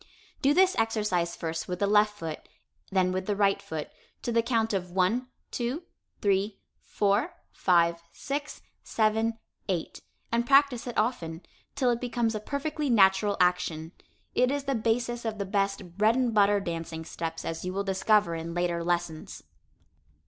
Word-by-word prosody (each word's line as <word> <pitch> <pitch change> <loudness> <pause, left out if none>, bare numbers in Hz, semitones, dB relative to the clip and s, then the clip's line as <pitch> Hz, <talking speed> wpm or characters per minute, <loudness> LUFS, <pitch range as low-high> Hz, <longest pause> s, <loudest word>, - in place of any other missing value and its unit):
Do 280 +2 +3
this 375 0 +5
exercise 210 -6 0
first 165 0 -4
with 180 - -3
the 200 - +1
left 210 +1 +3
foot, 160 -5 -6 0.4
then 185 -1 +2
with 185 0 -3
the 205 - +1
right 200 -1 +2
foot, 155 -2 -6 0.3
to 240 - -1
the 230 0 +3
count 225 -2 0
of 180 -2 -2
1, 195 +8 +1 0.2
2, 250 +8 -2 0.4
3, 200 0 +1 0.2
4, 210 - 0 0.2
5, 170 -2 +2
6, 290 +1 -5 0.2
7, 220 +1 +1 0.3
8, 175 -4 -2 0.3
and 235 +1 +1
practice 275 -3 +4
it 240 - -5
often, 175 -8 -1 0.3
till 260 -3 +2
it 235 - -2
becomes 240 -2 0
a 215 - -2
perfectly 285 +5 -3
natural 200 -2 +4
action. 170 -3 +1 0.4
It 250 0 +3
is 285 0 -1
the 275 -1 -1
basis 235 +1 0
of 220 -2 -3
the 200 - -2
best 195 -2 -2
"bread 220 +2 +4
and 250 -3 +1
butter" 205 -1 +4
dancing 165 -3 -5
steps, 165 0 -5
as 165 0 -4
you 180 - -3
will 195 +2 -2
discover 200 -1 +2
in 165 +1 -5
later 175 -1 0
lessons. 170 -2 -2
205 Hz, 165 wpm, -28 LUFS, 180-235 Hz, 0.4 s, this